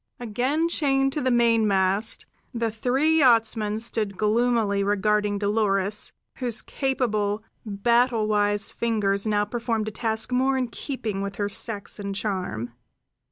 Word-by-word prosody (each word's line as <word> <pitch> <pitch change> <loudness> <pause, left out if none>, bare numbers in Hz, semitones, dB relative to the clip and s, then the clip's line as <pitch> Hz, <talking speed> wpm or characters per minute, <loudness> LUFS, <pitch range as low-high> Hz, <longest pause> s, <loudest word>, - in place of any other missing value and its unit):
Again 250 +8 0
chained 270 -5 +1
to 300 - -2
the 255 - +1
mainmast, 220 -4 +2 0.3
the 230 -1 -1
three 265 +8 +1
yachtsmen 225 -5 +3
stood 220 -3 -2
gloomily 215 -2 +1
regarding 205 +1 +1
Dolores, 205 -1 +1 0.3
whose 240 -3 +1
capable, 215 -6 -1 0.2
battle 235 +2 +2
wise 205 0 +1
fingers 210 -3 0
now 205 -1 +1
performed 225 0 -2
a - - -10
task 220 +2 -3
more 265 +2 +2
in 250 -2 -1
keeping 225 -7 -4
with 200 0 -4
her 205 0 -1
sex 205 0 -1
and 200 -1 -4
charm. 185 - -3
220 Hz, 130 wpm, -24 LUFS, 205-245 Hz, 0.3 s, yachtsmen